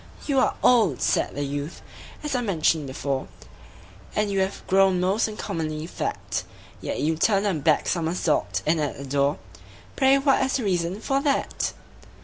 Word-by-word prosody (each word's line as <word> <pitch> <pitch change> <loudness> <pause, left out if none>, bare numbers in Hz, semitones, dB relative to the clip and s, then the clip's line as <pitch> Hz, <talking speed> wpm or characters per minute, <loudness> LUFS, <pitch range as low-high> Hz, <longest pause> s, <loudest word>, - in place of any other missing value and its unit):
"You 275 -3 +2
are - - +2
old," 215 - +4
said - - +1
the 145 - -2
youth, 145 +3 -5 0.4
"as 300 - -2
I 250 - +1
mentioned 160 - +1
before, 135 0 -3 0.9
And 210 -1 +1
you 195 - 0
have 190 +1 -2
grown 190 -1 +4
most 190 +5 +2
uncommonly 160 -7 -4
fat; 170 - -3 0.4
Yet - - -3
you 160 +2 +1
turned 195 +4 +2
a 200 - +2
back 155 -1 +2
somersault 165 -2 0
in 160 +1 +2
at 150 -2 -2
the 140 - -7
door 140 +2 +1 0.6
Pray 270 0 +5
what 275 -1 +3
is 265 - 0
the 260 - 0
reason 180 0 -1
for 270 +3 0
that?" 280 -1 0
180 Hz, 165 wpm, -25 LUFS, 155-215 Hz, 0.9 s, Pray